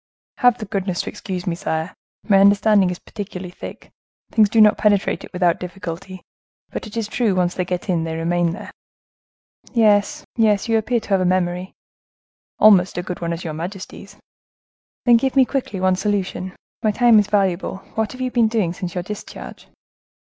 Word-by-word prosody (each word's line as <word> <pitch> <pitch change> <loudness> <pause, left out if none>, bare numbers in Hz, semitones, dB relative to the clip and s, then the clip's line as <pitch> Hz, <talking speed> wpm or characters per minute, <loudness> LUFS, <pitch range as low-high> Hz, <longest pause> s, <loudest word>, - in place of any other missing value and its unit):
"Have 245 -1 +4
the 215 - -6
goodness 195 -3 -2
to - - -5
excuse 185 -2 -6
me, 175 - -1
sire; 160 0 -3 0.3
my 195 -3 +5
understanding 200 -1 +4
is 180 - -4
particularly 190 -3 -8
thick; - - -10 0.4
things 215 -2 +4
do 225 - +2
not 210 -1 +7
penetrate 205 -2 +1
it - - -11
without 180 -2 +1
difficulty; 180 0 -7 0.5
but - - -5
it 215 - -9
is 225 -2 -1
true, 220 -3 0
once 180 -1 +1
they 180 - -1
get 180 +2 -4
in, 175 -4 0
they 160 0 -4
remain 170 +1 +1
there." 200 +6 -7 1.0
"Yes, 220 +5 +3
yes; 215 -3 +2
you 225 - +2
appear 235 +2 0
to - - -13
have 195 -2 +3
a - - +2
memory." 180 0 -1 0.8
"Almost 195 -4 +5
as 175 - -3
good 180 - -5
a - - -23
one 170 0 -2
as 170 +1 -4
your 160 -3 -4
majesty's." 180 +5 -8 0.9
"Then 240 -2 +7
give 265 +3 -1
me 265 -1 +6
quickly 250 -8 -3
one 185 0 +2
solution. 190 -2 -2 0.3
My 215 - +2
time 230 +1 +5
is 205 - +1
valuable. 195 -3 0 0.2
What 220 +1 -2
have 255 - -9
you 255 -1 -1
been 235 -2 +3
doing 215 -7 0
since 180 -1 -6
your 180 - -2
discharge?" 210 +2 -9
195 Hz, 190 wpm, -21 LUFS, 180-215 Hz, 1.0 s, not